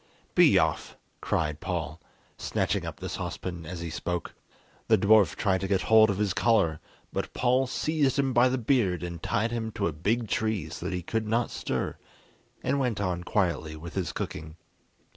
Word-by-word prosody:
"Be - - +6
off," - - 0 0.2
cried 75 -2 -1
Paul, - - -4 0.3
snatching - - -1
up - - -7
the - - -5
saucepan 85 -3 -5
as 85 0 -6
he 85 -1 -4
spoke. 90 +1 -3 0.5
The - - +5
dwarf 100 -4 +5
tried 95 -2 +1
to 95 - -1
get 95 -2 +1
hold 110 -1 +6
of 100 - 0
his 105 -2 0
collar, 95 -7 +2 0.3
but - - -3
Paul 125 +1 +2
seized 145 0 0
him 135 -2 +1
by 120 +1 +5
the 130 - 0
beard, 110 -8 +1
and 85 -1 -5
tied 115 +3 0
him 115 -1 -3
to - - -1
a 85 - 0
big 110 +9 0
tree 105 -6 -1
so 85 +3 -6
that 95 - -2
he 90 - -4
could 110 +4 -2
not 115 +2 0
stir, - - -3 0.7
and 140 - +1
went 125 -6 0
on 90 -3 -1
quietly 85 -5 0
with 80 +2 -9
his 95 -3 -2
cooking. 80 +1 -5
100 Hz, 185 wpm, -28 LUFS, 85-115 Hz, 0.7 s, Be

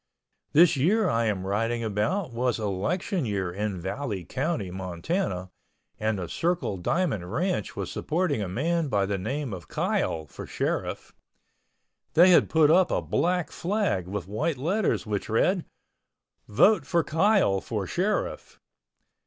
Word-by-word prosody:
This 165 +2 +6
year 190 +10 +2
I 115 -4 +1
am 100 -4 -1
writing 115 +4 -1
about 115 - -1
was 125 0 0
election 115 - -1
year 100 -6 -2
in 100 -1 -3
Valley 95 0 -4
County, 135 - -2
Montana, 95 - -3 0.5
and 110 -1 0
the 90 -2 -4
Circle 170 - -1
Diamond 100 - -1
ranch 180 - -1
was 95 -3 -4
supporting 155 - -1
a 100 - -2
man 160 - 0
by 100 -6 +1
the 100 0 -2
name 135 +4 -3
of 90 -3 -8
Kyle 80 -1 -1
for - - -9
sheriff. - - -3 1.0
They 180 +3 +7
had 175 - +5
put 155 -2 +5
up 180 +2 +5
a - - +1
black 180 -2 0
flag 185 - -1
with 95 -2 -4
white 110 +9 -1
letters 180 +9 0
which 105 -2 -3
read: 175 - +2 0.8
"VOTE 155 - +4
FOR 170 -1 +2
KYLE 160 - +2
FOR 105 -4 -3
SHERIFF." 190 - -2
120 Hz, 145 wpm, -26 LUFS, -, 1.0 s, They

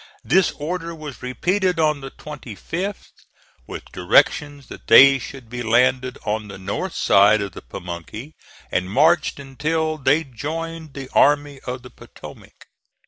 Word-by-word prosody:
This 180 +4 +3
order 165 +2 -5
was 150 -4 -9
repeated 180 +8 0
on 150 -2 +1
the 135 - -7
25th, 150 - -7 0.6
with - - -8
directions 145 -3 +2
that - - -12
they 135 +4 +8
should 130 -1 -9
be 120 +2 -6
landed 125 +2 +2
on 105 0 -2
the 100 -1 -9
north 95 +1 -4
side 105 +2 +5
of 100 -1 -4
the - - -10
Pamunkey, 90 - -8 0.4
and 90 +1 -1
marched 155 - +2
until 155 +3 -2
they 145 +4 +2
joined 160 +4 -6
the 135 -2 -6
Army 145 -1 +3
of 125 0 -5
the 125 - -12
Potomac. - - -14
140 Hz, 140 wpm, -21 LUFS, 120-155 Hz, 0.6 s, they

